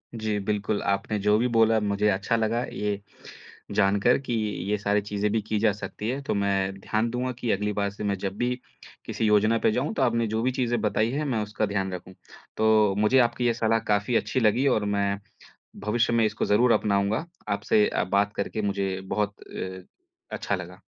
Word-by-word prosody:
जी, 110 Hz, -2 st, -1 dB
बिल्कुल, 105 Hz, +1 st, -1 dB
आपने 100 Hz, +2 st, -1 dB
जो 105 Hz, +1 st, +3 dB
भी 125 Hz, +2 st, +2 dB
बोला, 115 Hz, 0 st, +5 dB
मुझे 105 Hz, 0 st, 0 dB
अच्छा 100 Hz, +4 st, 0 dB
लगा 115 Hz, +2 st, 0 dB
ये 105 Hz, -1 st, -2 dB, 0.7 s
जान 100 Hz, 0 st, +3 dB
कर 120 Hz, +4 st, +4 dB
कि 135 Hz, -3 st, -4 dB, 0.4 s
ये 105 Hz, -, +1 dB
सारी 105 Hz, 0 st, +1 dB
चीज़ें 105 Hz, 0 st, -2 dB
भी 110 Hz, -1 st, +1 dB
की 105 Hz, 0 st, -2 dB
जा 110 Hz, -1 st, +3 dB
सकती 105 Hz, +2 st, -5 dB
हैं। 135 Hz, +2 st, -2 dB
तो -, -, -1 dB
मैं 95 Hz, -1 st, 0 dB
ध्यान 110 Hz, +4 st, -1 dB
दूँगा, 125 Hz, +2 st, -2 dB
कि 120 Hz, -2 st, -3 dB
अगली 105 Hz, +1 st, 0 dB
बार 100 Hz, 0 st, 0 dB
से 105 Hz, -, -8 dB
मैं 100 Hz, -1 st, 0 dB
जब 95 Hz, +1 st, -4 dB
भी 125 Hz, +1 st, 0 dB, 0.5 s
किसी 115 Hz, -, -2 dB
योजना 110 Hz, +2 st, +4 dB
पे 110 Hz, -, +2 dB
जाऊँ, 130 Hz, +6 st, -1 dB
तो -, -, -2 dB
आपने 115 Hz, -2 st, +1 dB
जो 110 Hz, +1 st, -1 dB
भी 130 Hz, -, +2 dB
चीज़ें 120 Hz, -3 st, 0 dB
बताई 110 Hz, +2 st, +1 dB
हैं, 150 Hz, +3 st, -2 dB
मैं 115 Hz, -6 st, 0 dB
उसका 105 Hz, +1 st, -2 dB
ध्यान 95 Hz, -2 st, -2 dB
रखूँ। 90 Hz, +1 st, -8 dB, 0.4 s
तो 110 Hz, -2 st, +4 dB
मुझे 105 Hz, +5 st, +4 dB
आपकी 120 Hz, +1 st, -4 dB
ये 115 Hz, -, +3 dB
सलाह 115 Hz, -1 st, +1 dB
काफ़ी 105 Hz, +4 st, 0 dB
अच्छी 115 Hz, +4 st, +1 dB
लगी 120 Hz, +4 st, +3 dB
और 110 Hz, -5 st, +2 dB
मैं 100 Hz, 0 st, 0 dB, 0.7 s
भविष्य 115 Hz, +2 st, +1 dB
में 115 Hz, -1 st, +3 dB
इसको -, -, -2 dB
ज़रूर 115 Hz, +4 st, +4 dB
अपनाऊँगा। 100 Hz, +7 st, +1 dB, 0.2 s
आपसे 100 Hz, +1 st, +2 dB
अ, -, -, 0 dB
बात 100 Hz, +2 st, +1 dB
करके 105 Hz, +2 st, -2 dB
मुझे 100 Hz, -2 st, -1 dB
बहुत 105 Hz, +1 st, 0 dB
अ, 95 Hz, 0 st, -7 dB, 0.5 s
अच्छा -, -, -2 dB
लगा। -, -, -7 dB
105 Hz, 205 wpm, -26 LUFS, 100-115 Hz, 0.7 s, बोला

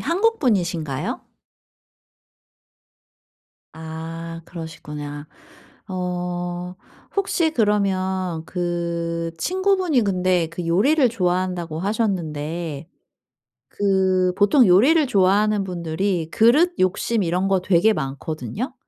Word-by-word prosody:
한국분이신가요? 215 Hz, -, 0 dB, 2.5 s
아 165 Hz, +1 st, -7 dB
그러시구나. 150 Hz, -3 st, -8 dB, 0.6 s
어 180 Hz, -1 st, -4 dB, 0.4 s
혹시 365 Hz, -4 st, +1 dB
그러면 190 Hz, -, 0 dB
그 170 Hz, -1 st, -2 dB
친구분이 370 Hz, -, +1 dB
근데 185 Hz, -3 st, +1 dB
그 170 Hz, 0 st, -5 dB
요리를 255 Hz, -, +3 dB
좋아한다고 180 Hz, -5 st, -1 dB
하셨는데 165 Hz, -7 st, -2 dB, 0.8 s
그 190 Hz, -2 st, +1 dB
보통 215 Hz, +3 st, +5 dB
요리를 275 Hz, -, +5 dB
좋아하는 205 Hz, +1 st, +3 dB
분들이 175 Hz, -1 st, -2 dB
그릇 295 Hz, +11 st, +4 dB
욕심 190 Hz, +4 st, +1 dB
이런 180 Hz, +3 st, 0 dB
거 190 Hz, -2 st, +2 dB
되게 190 Hz, +4 st, +3 dB
많거든요. 155 Hz, -, -4 dB
185 Hz, 205 characters per minute, -22 LUFS, 170-210 Hz, 2.5 s, 보통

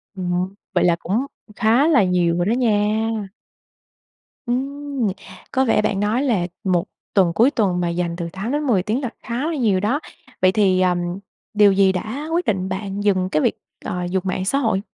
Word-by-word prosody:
Ừm. 180 Hz, 0 st, -2 dB, 0.2 s
Vậy 175 Hz, -, +2 dB
là 175 Hz, -1 st, +4 dB
cũng 220 Hz, +9 st, -1 dB, 0.3 s
khá 235 Hz, +7 st, +3 dB
là 275 Hz, -10 st, +5 dB
nhiều 175 Hz, -2 st, +1 dB
rồi 175 Hz, -, +1 dB
đó 210 Hz, -, +1 dB
nha. 215 Hz, -4 st, +2 dB, 1.5 s
Ừm. 275 Hz, 0 st, -2 dB, 0.4 s
Có 265 Hz, 0 st, +2 dB
vẻ 225 Hz, -, +3 dB
bạn 205 Hz, -2 st, 0 dB
nói 215 Hz, +6 st, +1 dB
là 210 Hz, -11 st, +1 dB, 0.2 s
một 180 Hz, -4 st, +1 dB, 0.3 s
tuần 185 Hz, -4 st, +3 dB
cuối 235 Hz, +10 st, +4 dB
tuần 195 Hz, -8 st, +1 dB
mà 175 Hz, -, 0 dB
dành 170 Hz, 0 st, -2 dB
từ 170 Hz, -1 st, -4 dB
8-10 235 Hz, 0 st, 0 dB
tiếng 225 Hz, +7 st, -1 dB
là 250 Hz, -, -2 dB
khá 240 Hz, +6 st, -2 dB
là 330 Hz, -, -2 dB
nhiều 220 Hz, -9 st, +2 dB
đó. 220 Hz, +9 st, 0 dB, 0.4 s
Vậy 185 Hz, 0 st, +5 dB
thì, 190 Hz, -3 st, +3 dB
ờm, 180 Hz, -1 st, +2 dB, 0.5 s
điều 210 Hz, -1 st, +6 dB
gì 195 Hz, 0 st, +4 dB
đã 220 Hz, -, -4 dB
quyết 345 Hz, +1 st, +1 dB
định 190 Hz, -3 st, -1 dB
bạn 195 Hz, +1 st, -4 dB
dừng 185 Hz, -3 st, +2 dB
cái 155 Hz, -, +1 dB
việc, -, -, +1 dB, 0.3 s
ờ, 180 Hz, 0 st, -3 dB
dùng 185 Hz, 0 st, -1 dB
mạng 185 Hz, 0 st, -2 dB
xã 275 Hz, -, +1 dB
hội? 220 Hz, -8 st, +1 dB
205 Hz, 190 wpm, -21 LUFS, 185-245 Hz, 1.5 s, điều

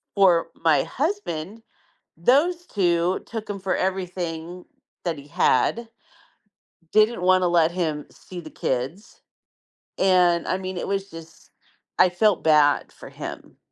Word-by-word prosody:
for 180 Hz, -4 st, +4 dB
my 160 Hz, -2 st, +3 dB
husband, 230 Hz, -, -3 dB, 0.6 s
those 320 Hz, -, +2 dB
two 175 Hz, -2 st, +1 dB
took 220 Hz, -2 st, -7 dB
him 205 Hz, -, -4 dB
for 190 Hz, 0 st, -1 dB
everything 180 Hz, -2 st, -3 dB, 0.4 s
that 170 Hz, -4 st, -2 dB
he 140 Hz, -, -12 dB
had, 230 Hz, +9 st, +1 dB, 1.0 s
didn't 215 Hz, -3 st, +3 dB
want 185 Hz, 0 st, +4 dB
to 180 Hz, -, +2 dB
let 170 Hz, -1 st, +3 dB
him 155 Hz, -5 st, -2 dB
see 180 Hz, -, -11 dB
the 155 Hz, -2 st, -10 dB
kids, 135 Hz, -, -4 dB, 0.8 s
and 180 Hz, -3 st, +3 dB
I 185 Hz, -, +1 dB
mean, 185 Hz, 0 st, -6 dB
it -, -, -4 dB
was 195 Hz, 0 st, -2 dB
just 165 Hz, 0 st, -13 dB, 0.5 s
I 185 Hz, -, +6 dB
felt 180 Hz, +2 st, +2 dB
bad 150 Hz, -2 st, +3 dB
for -, -, -12 dB
him. -, -, -9 dB
180 Hz, 135 wpm, -23 LUFS, 165-200 Hz, 1.0 s, I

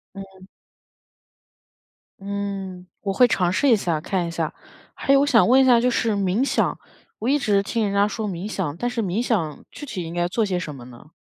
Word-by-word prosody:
嗯。 190 Hz, -1 st, -11 dB, 1.7 s
嗯， 195 Hz, -2 st, -5 dB, 0.2 s
我 195 Hz, -2 st, -2 dB
会 250 Hz, +5 st, +5 dB
尝 180 Hz, -6 st, +1 dB
试 270 Hz, +10 st, +2 dB
一 235 Hz, -, +7 dB
下， 170 Hz, -6 st, -1 dB
看 180 Hz, +1 st, -1 dB
一 -, -, -5 dB
下。 165 Hz, -2 st, -3 dB, 0.4 s
还 275 Hz, -, +1 dB
有 275 Hz, -, +5 dB
我 -, -, +3 dB
想 245 Hz, -6 st, +4 dB
问 260 Hz, +3 st, +6 dB
一 -, -, +4 dB
下 245 Hz, -2 st, +6 dB
就 250 Hz, -, +2 dB
是 230 Hz, -2 st, 0 dB
冥 200 Hz, +3 st, +1 dB
想， 275 Hz, -, 0 dB, 0.4 s
我 230 Hz, -, -1 dB
一 285 Hz, -, +4 dB
直 205 Hz, -7 st, +2 dB
听 230 Hz, +2 st, -1 dB
人 200 Hz, -1 st, -1 dB
家 200 Hz, +1 st, +3 dB
说 215 Hz, 0 st, -4 dB
冥 185 Hz, 0 st, -4 dB
想， 175 Hz, -9 st, -3 dB
但 245 Hz, +6 st, -1 dB
是 245 Hz, -1 st, -2 dB
冥 200 Hz, +2 st, -1 dB
想 180 Hz, -11 st, -1 dB
具 290 Hz, -, -9 dB
体 190 Hz, -10 st, -5 dB
应 165 Hz, 0 st, -7 dB
该 175 Hz, 0 st, 0 dB
做 215 Hz, +5 st, 0 dB
些 185 Hz, -3 st, -1 dB
什 160 Hz, -4 st, -6 dB
么 125 Hz, -3 st, -11 dB
呢？ 125 Hz, +5 st, -15 dB
200 Hz, 235 characters per minute, -23 LUFS, 180-230 Hz, 1.7 s, 一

